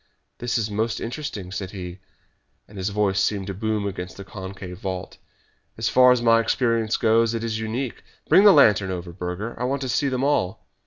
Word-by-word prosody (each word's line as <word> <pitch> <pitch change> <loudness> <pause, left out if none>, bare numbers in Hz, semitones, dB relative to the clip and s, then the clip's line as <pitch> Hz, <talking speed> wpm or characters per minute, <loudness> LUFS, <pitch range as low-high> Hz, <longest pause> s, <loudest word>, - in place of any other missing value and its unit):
"This 120 -1 -1
is 110 -2 -2
most 110 +2 -1
interesting," 115 -7 -5
said 95 -1 -4
he, 90 -2 -7 0.7
and 105 - -16
his 95 +1 -2
voice 100 -2 +1
seemed 100 0 0
to 100 - -4
boom 105 +1 -2
against 90 -2 -5
the 100 - -7
concave 95 -2 -8
vault. 95 -2 -5 0.6
"As - - 0
far 125 0 +6
as 125 -1 +2
my 115 -1 +5
experience 115 -1 +1
goes, 115 +1 +3
it 115 - -3
is 110 -1 -2
unique. 115 +3 -4 0.3
Bring 195 - +6
the 205 - +9
lantern 105 - +5
over, 90 -1 -5
Burger, 90 +5 -4
for - - -11
I - - +1
want 135 +2 -1
to 130 - -3
see 140 +4 +1
them 130 0 -1
all." 115 -10 0
110 Hz, 205 wpm, -24 LUFS, 95-115 Hz, 0.7 s, the